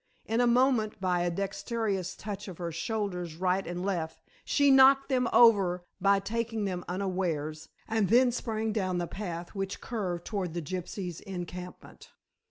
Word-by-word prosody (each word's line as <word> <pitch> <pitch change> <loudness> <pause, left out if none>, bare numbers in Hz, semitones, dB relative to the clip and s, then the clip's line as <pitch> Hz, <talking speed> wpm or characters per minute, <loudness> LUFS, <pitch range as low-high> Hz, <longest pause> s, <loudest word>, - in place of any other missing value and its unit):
In 225 +2 +1
a 245 - +4
moment, 240 -3 +2
by 180 -2 +1
a 175 - +1
dexterous 195 +1 -2
touch 205 0 -6
of 185 -4 -8
her 170 -2 -4
shoulders 180 -2 -3
right 185 +2 0
and 175 +1 -4
left, 170 -5 -2 0.2
she 285 -1 +3
knocked 270 +1 +6
them 250 -2 +2
over 195 -7 +5 0.2
by 200 +1 +4
taking 225 +1 -2
them 180 -2 -3
unawares, 175 -5 -2 0.2
and 220 -4 +1
then 245 +3 +5
sprang 220 -2 -2
down 185 -4 0
the 175 - -1
path 175 -2 -5
which 195 -1 -3
curved 185 -7 -3
towards 190 -6 -3
the 170 - -1
gypsies' 180 +1 -5
encampment. 180 -2 -8
195 Hz, 160 wpm, -29 LUFS, 175-225 Hz, 0.2 s, knocked